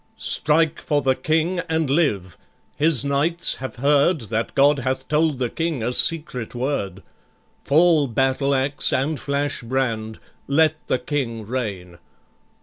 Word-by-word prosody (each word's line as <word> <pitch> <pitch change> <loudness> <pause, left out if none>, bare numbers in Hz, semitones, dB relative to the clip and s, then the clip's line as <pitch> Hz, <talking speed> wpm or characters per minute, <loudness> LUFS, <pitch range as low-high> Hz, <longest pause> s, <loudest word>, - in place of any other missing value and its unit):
"Strike 155 +1 +1
for 145 -2 0
the 130 0 +3
King 160 +7 0
and 160 -1 0
live! 130 - 0 0.4
his 150 -3 +3
knights 150 +5 +1
have 130 0 -7
heard 145 +6 +2
That 115 +1 -3
God 140 +1 +4
hath 130 +1 -3
told 155 -1 +1
the 125 -1 -1
King 160 -2 -3
a 120 +2 -1
secret 130 -7 0
word. 110 -8 -3 0.6
Fall 155 0 +4
battle 135 +3 0
axe, 135 +1 0
and 140 +3 -1
flash 140 0 -2
brand! 115 -3 -2 0.3
Let 155 +2 +3
the - - +1
King 125 -4 -3
reign. 100 -8 -5
140 Hz, 140 wpm, -22 LUFS, 125-155 Hz, 0.6 s, God